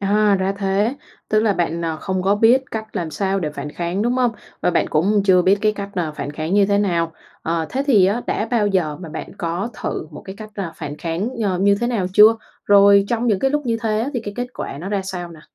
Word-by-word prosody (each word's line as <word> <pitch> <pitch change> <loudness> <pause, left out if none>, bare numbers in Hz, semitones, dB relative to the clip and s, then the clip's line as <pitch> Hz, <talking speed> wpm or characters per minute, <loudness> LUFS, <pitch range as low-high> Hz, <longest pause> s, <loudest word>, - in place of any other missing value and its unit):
À, 205 +1 +3
ra 190 +1 0
thế, 200 +5 +1 0.3
tức 215 0 +3
là 215 -2 +2
bạn, 170 -2 -1
ờ, 160 -1 -2
không 185 +2 -3
có 195 +2 +3
biết 235 +5 +4
cách 220 -1 -6
làm 170 -3 -2
sao 195 +2 -1
để 155 - -2
phản 150 0 -6
kháng, 175 +3 -2
đúng 240 +2 +1
hông? 250 -2 +2 0.3
Và - - +2
bạn - - +1
cũng 195 +7 +2
chưa 185 -2 +5
biết 195 +3 +3
cái 215 0 +2
cách, 200 -1 -6
à, 175 -4 -1
phản 145 -1 -5
kháng 155 +4 -3
như 200 -1 +4
thế 200 0 +2
nào. 170 -5 0 0.3
Ờ, 165 0 -1
thế 270 - -1
thì 210 -10 +5
á, 210 +5 0
đã 215 - -1
bao 230 -4 +2
giờ 175 -7 0
mà 175 -2 -9
bạn 155 - -7
có 175 +6 -2
thử - - -3
một 150 - -10
cái 190 0 -8
cách, 215 0 -9
à, 190 -5 -4
phản 145 +1 -6
kháng, 170 +8 -2 0.2
ờ, 185 -3 0
như 200 +2 +4
thế 240 - +1
nào 225 -7 0
chưa? 215 +3 +7 0.3
Rồi 200 0 +6
trong 235 0 0
những 210 -5 +2
cái 270 - +1
lúc 295 -1 -1
như 230 -1 +1
thế 215 -1 0
á, 240 - -1
thì 245 - -1
cái 205 -2 -7
kết 245 0 -2
quả 140 - -6
nó 180 - -5
ra 200 -1 -1
sao 180 -2 -5
nè? 160 -2 -13
200 Hz, 265 wpm, -20 LUFS, 175-215 Hz, 0.3 s, chưa